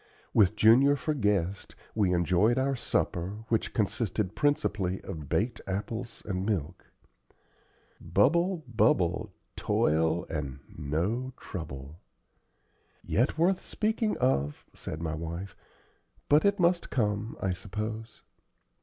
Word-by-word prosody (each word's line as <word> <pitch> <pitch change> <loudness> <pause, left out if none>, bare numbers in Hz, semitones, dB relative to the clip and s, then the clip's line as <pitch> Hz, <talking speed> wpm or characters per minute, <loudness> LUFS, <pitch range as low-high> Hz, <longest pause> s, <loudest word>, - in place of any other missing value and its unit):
With 105 -1 +4
Junior 125 +7 +6
for 155 +2 -1
guest, 100 - -1 0.2
we 100 -4 +2
enjoyed 90 +7 +3
our 135 +1 +1
supper, 105 -2 -2
which 115 - +1
consisted 105 -2 -1
principally 105 - +1
of 80 -7 -7
baked 115 +4 0
apples 110 +5 -4
and 95 -2 -2
milk. 90 -5 -3 1.1
"'Bubble, 170 +4 +2
bubble,' 105 -3 +2 0.2
'Toil' 80 +2 +1
and 70 -4 -4 0.2
no 90 - -2
'trouble' 75 -3 -7 0.5
" - - -40 0.2
"Yet, 130 +6 +2
worth 180 +3 +3
speaking 220 0 0
of," 75 - 0
said 80 +2 -6
my 80 -1 -2
wife; 85 +4 -5 0.7
"but 150 +4 +5
it 200 0 +3
must 175 0 +2
come, 105 -3 -1
I 95 - 0
suppose." 110 +4 -6
105 Hz, 115 wpm, -29 LUFS, 85-130 Hz, 1.1 s, Junior